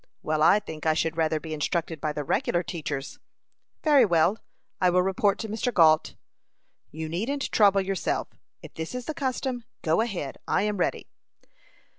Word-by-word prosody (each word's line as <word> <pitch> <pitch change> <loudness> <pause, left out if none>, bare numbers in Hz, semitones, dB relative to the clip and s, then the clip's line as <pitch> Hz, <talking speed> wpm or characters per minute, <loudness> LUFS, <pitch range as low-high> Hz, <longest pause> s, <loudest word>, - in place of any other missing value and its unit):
"Well, 155 0 0
I 195 +6 +6
think 160 -5 -7
I 155 - +3
should 160 0 0
rather 160 -1 +1
be 160 0 -7
instructed 160 +1 -2
by 155 - -1
the 150 0 -4
regular 175 +5 0
teachers." 150 -5 -5 0.6
"Very 290 -4 +6
well; 175 +1 +3 0.4
I 180 - +5
will 180 +1 +3
report 195 +1 +1
to 220 - -5
Mr. 220 +4 -2
Gault." 160 -6 +4 0.7
"You 160 +1 -6
needn't 230 - -2
trouble 200 -2 +5
yourself. 190 -1 -2 0.3
If - - -11
this 160 +8 -6
is 250 -1 -5
the 310 - -3
custom, 260 -3 -2 0.2
go 160 +5 +2
ahead. 185 - -4
I - - +2
am 210 -1 -1
ready." 180 - -1
175 Hz, 170 wpm, -26 LUFS, 160-215 Hz, 0.7 s, I